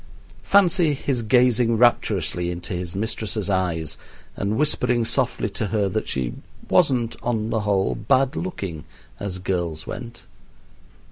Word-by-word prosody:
Fancy 180 Hz, -6 st, +4 dB
his 130 Hz, -2 st, -1 dB
gazing 120 Hz, 0 st, +3 dB
rapturously 95 Hz, -7 st, +2 dB
into 90 Hz, 0 st, -5 dB
his 90 Hz, 0 st, -4 dB
mistress' 105 Hz, -1 st, -2 dB
eyes 85 Hz, -4 st, -1 dB, 0.4 s
and 100 Hz, +2 st, -1 dB
whispering 125 Hz, -5 st, +1 dB
softly -, -, 0 dB
to 110 Hz, -, -2 dB
her 105 Hz, -1 st, +1 dB
that -, -, -2 dB
she 65 Hz, -2 st, -2 dB, 0.4 s
wasn't, 130 Hz, -9 st, +3 dB
on 115 Hz, -2 st, -1 dB
the 110 Hz, -, +1 dB
whole, 100 Hz, -2 st, +1 dB
bad 130 Hz, +6 st, +2 dB
looking, 95 Hz, -, -4 dB, 0.4 s
as 100 Hz, -2 st, -4 dB
girls 85 Hz, -4 st, -2 dB
went! 115 Hz, +1 st, -7 dB
110 Hz, 130 wpm, -23 LUFS, 90-120 Hz, 0.4 s, Fancy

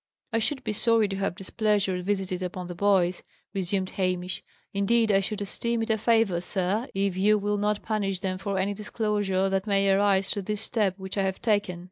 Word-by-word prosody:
"I 225 Hz, -, +3 dB
should 260 Hz, +3 st, -1 dB
be 215 Hz, -, -2 dB
sorry 225 Hz, 0 st, +3 dB
to 195 Hz, -, -3 dB
have 195 Hz, -2 st, -1 dB
displeasure 195 Hz, -1 st, 0 dB
visited 190 Hz, -1 st, -1 dB
upon 180 Hz, 0 st, -4 dB
the 175 Hz, -, -6 dB
boys," 185 Hz, -1 st, +2 dB, 0.3 s
resumed 190 Hz, 0 st, -1 dB
Hamish. 185 Hz, -1 st, -2 dB, 0.3 s
"Indeed, 220 Hz, +3 st, +3 dB
I 195 Hz, -, +5 dB
should 205 Hz, +2 st, -3 dB
esteem 235 Hz, +3 st, 0 dB
it 225 Hz, -, -1 dB
a 220 Hz, -, +2 dB
favour, 225 Hz, -6 st, +2 dB
sir, 195 Hz, +6 st, -1 dB
if 195 Hz, -1 st, 0 dB
you 210 Hz, +3 st, +4 dB
will 205 Hz, 0 st, -1 dB
not 210 Hz, 0 st, 0 dB
punish 200 Hz, -4 st, -1 dB
them 185 Hz, -1 st, -2 dB
for 195 Hz, 0 st, -2 dB
any 195 Hz, +2 st, 0 dB
disclosure 205 Hz, -2 st, 0 dB
that 195 Hz, +1 st, -1 dB
may 195 Hz, -1 st, +3 dB
arise 195 Hz, 0 st, +3 dB
through 205 Hz, -, -2 dB
this 210 Hz, 0 st, -1 dB
step 210 Hz, -5 st, 0 dB
which 190 Hz, +1 st, -5 dB
I -, -, +3 dB
have 190 Hz, 0 st, -2 dB
taken. 205 Hz, -5 st, 0 dB
200 Hz, 200 wpm, -27 LUFS, 190-210 Hz, 0.3 s, I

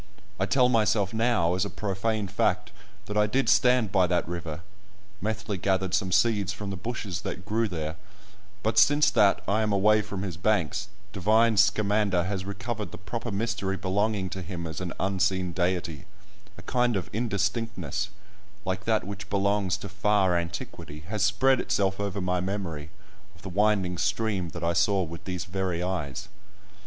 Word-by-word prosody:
I 95 Hz, -, +1 dB
tell 125 Hz, +1 st, +4 dB
myself 110 Hz, -4 st, +2 dB
now, 110 Hz, -7 st, +2 dB
as 90 Hz, +1 st, +1 dB
a 100 Hz, -, -2 dB
profane 105 Hz, +1 st, -2 dB
fact, 100 Hz, -, 0 dB, 0.3 s
that 105 Hz, -, -5 dB
I 105 Hz, 0 st, +4 dB
did 135 Hz, +6 st, +1 dB
stand 125 Hz, -5 st, +4 dB
by 90 Hz, -1 st, +4 dB
that 90 Hz, -2 st, 0 dB
river 85 Hz, -2 st, -5 dB, 0.6 s
(Methley 105 Hz, -2 st, -2 dB
gathered 95 Hz, 0 st, 0 dB
some 95 Hz, -2 st, +1 dB
seeds 105 Hz, -1 st, +3 dB
from 100 Hz, -1 st, -5 dB
the -, -, -3 dB
bushes 100 Hz, -3 st, -4 dB
that 90 Hz, -, -5 dB
grew 110 Hz, +2 st, +1 dB
there), 80 Hz, -4 st, -4 dB, 0.7 s
but 110 Hz, -, +3 dB
since 145 Hz, +2 st, +5 dB
that 100 Hz, -2 st, +4 dB
I 105 Hz, +2 st, +2 dB
am 110 Hz, -1 st, +1 dB
away 105 Hz, +2 st, +4 dB
from 100 Hz, -2 st, -5 dB
his 90 Hz, -5 st, -4 dB
banks, 90 Hz, -3 st, 0 dB, 0.3 s
"divine 110 Hz, +4 st, +3 dB
Scamander" 100 Hz, -2 st, +3 dB
has 95 Hz, 0 st, -3 dB
recovered 110 Hz, +2 st, -4 dB
the -, -, -8 dB
proper 115 Hz, +4 st, -5 dB
mystery 100 Hz, -2 st, -1 dB
belonging 100 Hz, 0 st, 0 dB
to 95 Hz, -, -4 dB
him 85 Hz, -1 st, -5 dB
as 80 Hz, +2 st, -5 dB
an 90 Hz, -2 st, -3 dB
unseen 95 Hz, -1 st, +1 dB
deity; 90 Hz, -3 st, -1 dB, 0.5 s
a -, -, -11 dB
kind 125 Hz, -2 st, +1 dB
of 95 Hz, -, -2 dB
indistinctness, 110 Hz, 0 st, -1 dB, 0.6 s
like 95 Hz, +1 st, -2 dB
that 110 Hz, -1 st, +2 dB
which 100 Hz, 0 st, -7 dB
belongs 100 Hz, -2 st, +1 dB
to 100 Hz, -, -7 dB
far 100 Hz, -2 st, +2 dB
antiquity, 85 Hz, -3 st, -5 dB
has 105 Hz, 0 st, -2 dB
spread 130 Hz, +6 st, +3 dB
itself 95 Hz, -4 st, 0 dB
over 100 Hz, -1 st, -2 dB
my 90 Hz, -1 st, 0 dB
memory, 90 Hz, -6 st, -4 dB, 0.5 s
of 85 Hz, -, -19 dB
the 95 Hz, -, -5 dB
winding 95 Hz, -2 st, +1 dB
stream 100 Hz, -6 st, 0 dB
that 85 Hz, +1 st, -7 dB
I 85 Hz, 0 st, +2 dB
saw 95 Hz, +2 st, +3 dB
with 85 Hz, -1 st, -8 dB
these 90 Hz, -2 st, -3 dB
very 90 Hz, -2 st, -2 dB
eyes. 85 Hz, -8 st, -3 dB
100 Hz, 170 wpm, -27 LUFS, 90-105 Hz, 0.7 s, since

